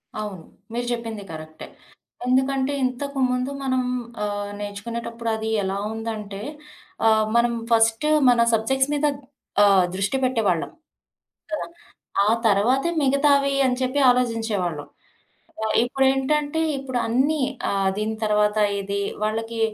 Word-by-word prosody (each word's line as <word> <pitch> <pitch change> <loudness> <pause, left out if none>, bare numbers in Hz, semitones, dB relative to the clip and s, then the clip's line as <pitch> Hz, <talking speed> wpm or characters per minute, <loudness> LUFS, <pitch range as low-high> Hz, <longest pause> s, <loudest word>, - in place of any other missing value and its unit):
అవును. 205 -6 -5 0.3
మీరు 240 +1 -2
జెప్పింది 225 -3 -4
కరక్టే. 155 0 -9 0.6
ఎందుకంటే, 265 +2 +1
ఇంతకు 270 +2 -2
ముందు 250 +2 -1
మనం 260 -1 +1 0.4
ఆహ్, 205 0 -3
నేర్చుకునేటప్పుడు 230 +3 -5
అది 220 0 -3
ఎలా 190 +1 -2 0.2
ఉందంటే, 215 -3 -5 0.7
ఆహ్, 220 -1 +4
మనం 235 0 +3 0.2
ఫస్ట్ 225 +5 +3 0.2
మన 240 -1 +4
సబ్జెక్ట్స్ 265 +5 +1
మీద 295 +1 +1 0.6
ఆహ్, 195 -2 +6
దృష్టి 200 +7 0
బెట్టేవాళ్ళం. 220 -10 +1 0.8
కదా! 310 - -3 0.6
ఆ - - +1 0.2
తరవాతే 240 +10 +3
మిగతావి 280 0 +3
అని 250 -1 +2
చెప్పి 260 +3 0
ఆలోజించేవాళ్ళం. 225 -11 0 0.7
కదా! 220 0 -2
ఇప్పుడేంటంటే 270 +4 +1 0.2
ఇప్పుడు 260 -2 -3
అన్నీ, 270 +6 +1 0.3
ఆహ్, 195 -1 +1
దీని 220 +1 -2
తర్వాత 210 0 +2 0.2
ఇది. 200 +1 -2 0.2
వాళ్ళకి 225 +1 -2
230 Hz, 115 wpm, -23 LUFS, 210-265 Hz, 0.8 s, ఆహ్